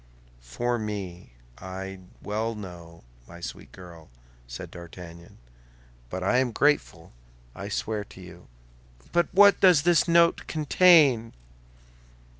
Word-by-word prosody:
"For 120 - -3
me, 95 - -6 0.3
I 95 +1 -7 0.2
well 110 +2 -3
know, 85 -5 -11 0.2
my 85 - -12
sweet 85 - -9
girl," 85 -3 -14 0.4
said - - -9
D'Artagnan. 85 0 -12 0.7
"But 95 +5 -5
I 125 +7 +2
am 130 -2 0
grateful, 140 - 0 0.4
I 100 +1 -8
swear 105 +1 -3
to 95 - -16
you." 90 -1 -13 0.6
"But 175 0 +1
what 200 0 +6
does 180 -6 +5
this 175 -1 +3
note 170 0 +3
contain?" 150 -7 +4
105 Hz, 115 wpm, -26 LUFS, 90-145 Hz, 0.7 s, what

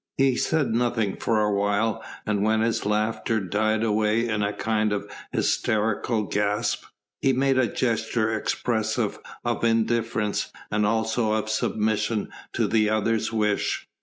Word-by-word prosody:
He 135 -2 +3
said 140 -4 +1
nothing 115 -4 0
for 110 -2 +1
a 105 -1 +2
while, 105 +2 0 0.2
and 105 -2 0
when 110 +1 +2
his 115 -2 0
laughter 110 +1 0
died 110 +3 0
away 110 +1 +2
in 110 -2 -1
a 100 0 +1
kind 110 0 0
of 105 - -2 0.2
hysterical 110 +1 0
gasp, 105 +4 -1 0.4
he 135 - +3
made 135 0 +2
a 125 - +3
gesture 110 -2 0
expressive 110 0 -1 0.3
of - - -1
indifference 115 -2 +1 0.2
and 105 0 +2
also 110 0 +1
of 110 0 -1
submission 110 0 0 0.2
to - - +1
the 110 -1 +2
other's 110 +1 +1
wish. 105 -2 0
110 Hz, 140 wpm, -25 LUFS, 105-115 Hz, 0.4 s, He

